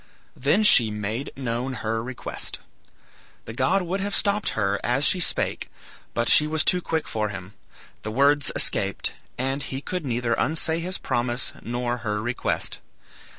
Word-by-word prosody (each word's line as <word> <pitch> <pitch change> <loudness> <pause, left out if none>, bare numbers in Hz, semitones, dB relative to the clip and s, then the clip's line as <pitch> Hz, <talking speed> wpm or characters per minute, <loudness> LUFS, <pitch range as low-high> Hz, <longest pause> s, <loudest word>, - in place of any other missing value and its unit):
Then 150 +11 +2
she 125 - +7
made 105 +5 -3
known 125 0 -2
her 115 -1 -2
request. 125 0 -5 0.9
The 110 - -7
god 185 +10 +2
would 180 +3 -2
have 200 +1 -1
stopped 200 - +1
her 100 -1 +1
as 130 +4 +1
she 185 - +3
spake, 175 - 0 0.5
but 120 0 0
she 150 - +7
was 155 0 0
too 180 -1 +3
quick 160 -2 -2
for 105 -1 -2
him. 95 0 -8 0.5
The 110 - -5
words 140 +3 +3
escaped, - - +1 0.2
and 135 +2 -1
he 135 - -4
could 180 +4 -4
neither 120 -3 -1
unsay 160 +1 +1
his 180 +2 -3
promise 120 +1 -1
nor 120 +1 -2
her 105 -3 -3
request. 120 +3 -2
125 Hz, 155 wpm, -24 LUFS, 115-160 Hz, 0.9 s, she